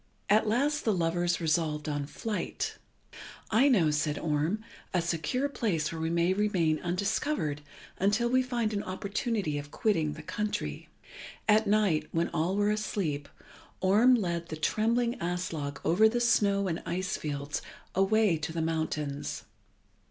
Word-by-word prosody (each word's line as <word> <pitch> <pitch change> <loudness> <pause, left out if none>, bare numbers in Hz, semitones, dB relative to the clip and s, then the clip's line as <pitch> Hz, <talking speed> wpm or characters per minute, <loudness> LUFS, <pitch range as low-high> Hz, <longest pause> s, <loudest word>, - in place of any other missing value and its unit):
At 215 +1 +4
last 285 +7 +1
the 215 -3 +2
lovers 175 0 +1
resolved 155 -2 0
on 145 -1 -2
flight. 215 +7 -3 0.8
"I 235 +6 +5
know," 175 - +4
said 150 0 0
Orm, 160 +7 0 0.3
"a - - +4
secure 170 - -1
place 185 - -1
where 165 -1 -5
we 160 - 0
may 170 +2 +2
remain 185 -6 +1
undiscovered 180 - -1 0.4
until 210 +5 +2
we 255 +2 +3
find 240 -4 -1
an 200 - -1
opportunity 200 - -2
of 145 0 -8
quitting 160 -6 0
the 155 +1 -9
country." 210 +6 -3 0.6
At 215 0 +4
night, 200 -6 +2
when 165 +1 0
all 170 +3 0
were 205 +1 +2
asleep, 175 -9 -2 0.5
Orm 215 +7 +5
led 170 -6 -1
the 155 - -5
trembling 235 +8 +1
Aslog 170 -5 -3
over 215 +6 +5
the 240 +2 0
snow 200 -4 +3
and 165 -2 -2
ice 185 +2 -2
fields 145 -1 -3 0.3
away 195 -1 +3
to 155 +1 -4
the 165 - -3
mountains. 160 -3 -2
180 Hz, 145 wpm, -29 LUFS, 155-215 Hz, 0.8 s, I